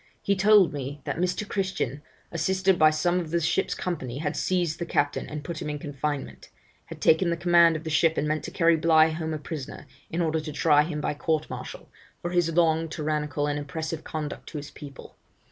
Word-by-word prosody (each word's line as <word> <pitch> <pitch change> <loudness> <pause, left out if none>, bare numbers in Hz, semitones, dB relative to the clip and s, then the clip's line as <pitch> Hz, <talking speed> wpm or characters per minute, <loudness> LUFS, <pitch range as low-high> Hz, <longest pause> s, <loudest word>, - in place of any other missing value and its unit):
He 200 - +2
told 200 -2 +5
me 140 0 -5
that - - -3
Mr. 180 +3 -1
Christian, 190 - -2 0.3
assisted 185 +2 +1
by 155 - +7
some 175 +4 +1
of 170 -3 -5
the 170 +2 +1
ship's 170 +3 0
company 135 -9 -4
had 145 0 -2
seized 175 -4 0
the 170 - -2
captain 145 -3 0
and 150 -1 -6
put 165 0 -6
him - - -3
in 150 - -3
confinement; 145 0 -5 0.4
had - - -10
taken 165 +3 +4
the 170 - 0
command 170 -1 +5
of 155 - -5
the 160 - -4
ship 160 +1 +3
and 150 - 0
meant 155 0 -1
to - - -4
carry 170 -2 +3
Bligh 160 -1 +5
home 160 0 -3
a 155 - -2
prisoner, 150 -2 -7 0.2
in 165 - -3
order 160 -2 +1
to 155 0 -6
try 150 0 +4
him 150 -1 -3
by - - -1
court 155 +1 -1
martial, - - -7 0.3
for 175 - -4
his 175 -2 +2
long 165 -1 +2
tyrannical 150 -1 -2
and 145 0 -1
oppressive 155 +2 -5
conduct 155 -2 -5
to 155 - -6
his 145 0 -7
people. 140 -2 -11
160 Hz, 215 wpm, -26 LUFS, 150-170 Hz, 0.4 s, by